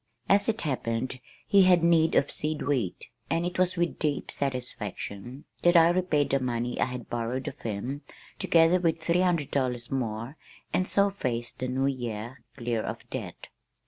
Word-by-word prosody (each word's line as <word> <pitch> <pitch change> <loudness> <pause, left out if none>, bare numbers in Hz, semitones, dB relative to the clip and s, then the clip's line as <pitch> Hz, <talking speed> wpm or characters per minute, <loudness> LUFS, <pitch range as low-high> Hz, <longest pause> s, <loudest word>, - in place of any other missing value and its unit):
As 200 +3 +4
it 225 0 0
happened 130 -3 -2 0.3
he 200 - +5
had 180 -2 +5
need 165 -1 +4
of 140 - +3
seed 155 0 -2
wheat, 125 -11 -1 0.2
and 165 +1 +1
it 180 0 -3
was 185 0 +2
with 170 0 0
deep 150 -2 -1
satisfaction 125 -2 -4 0.2
that 175 0 +5
I 165 0 +7
repaid 175 -5 +1
the 135 - +3
money 120 -1 -2
I - - +5
had 125 -2 -6
borrowed 120 +2 -3
of - - -6
him, 115 +6 -4 0.4
together 165 +2 +4
with 165 -2 +1
three 170 +2 +2
hundred 170 -6 +1
dollars 125 -3 -1
more 120 +1 -3 0.4
and 185 - +1
so 200 0 +3
faced 120 -10 -3
the 130 - -2
new 130 +2 0
year 120 -2 -3
clear 120 -3 -1
of - - -6
debt. - - -6
135 Hz, 175 wpm, -28 LUFS, 120-170 Hz, 0.4 s, I